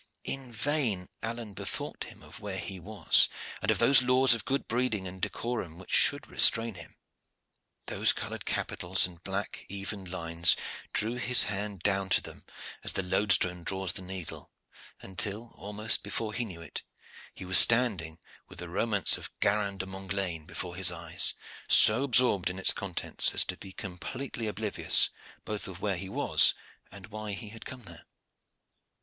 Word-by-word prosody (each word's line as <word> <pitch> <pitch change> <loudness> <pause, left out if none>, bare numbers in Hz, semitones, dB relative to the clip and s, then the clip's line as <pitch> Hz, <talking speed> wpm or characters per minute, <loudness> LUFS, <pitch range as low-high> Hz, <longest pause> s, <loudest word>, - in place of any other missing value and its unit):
In 135 -2 -4
vain 115 -7 -1
Alleyne 115 -2 -5
bethought - - -4
him - - -14
of - - -12
where 100 -2 -5
he 95 -1 -7
was, 95 -2 +4 0.3
and - - -2
of - - +3
those 125 +2 +6
laws 130 0 +4
of 115 - -3
good 135 +1 -2
breeding 115 -5 -1
and 95 +1 -10
decorum 110 -9 -4
which 95 - -12
should - - +3
restrain 115 0 +4
him: 85 -4 -13 0.9
those - - +2
colored - - -6
capitals 90 +2 +1
and 85 -2 -10
black 95 +1 -4
even 100 0 -6
lines 85 -1 +3 0.4
drew 115 +3 0
his 125 0 +4
hand 100 -2 -4
down 95 -1 0
to - - +4
them, - - -12 0.4
as - - -2
the 95 - -1
loadstone 90 -2 +1
draws 95 -1 -1
the - - -4
needle, 95 -3 -7 0.5
until, 105 +4 -3
almost 105 +2 0
before 110 -1 -4
he 120 +1 -2
knew 85 -6 -9
it, - - -7 0.5
he 95 - -9
was 95 0 +7
standing 105 -10 +3 0.3
with - - -14
the 90 -1 -7
romance 100 +2 +2
of - - -8
Garin 100 -1 0
de 95 - -4
Montglane 95 -4 -4
before 90 -1 -6
his 95 -2 +2
eyes, 85 -1 -1 0.3
so 110 +5 +8
absorbed 120 -8 +3
in 90 - -6
its 95 - +3
contents 95 -3 0
as - - +4
to - - -4
be 95 - -11
completely 110 +6 -6
oblivious 105 0 +2 0.3
both 105 -1 -5
of 95 -2 -9
where 100 -2 -1
he 95 +2 -7
was - - +4 0.4
and 100 -1 -11
why 110 -1 -5
he 105 +1 -7
had 115 +1 -12
come 130 -2 -9
there. 85 -5 -12
100 Hz, 165 wpm, -29 LUFS, 90-115 Hz, 0.9 s, so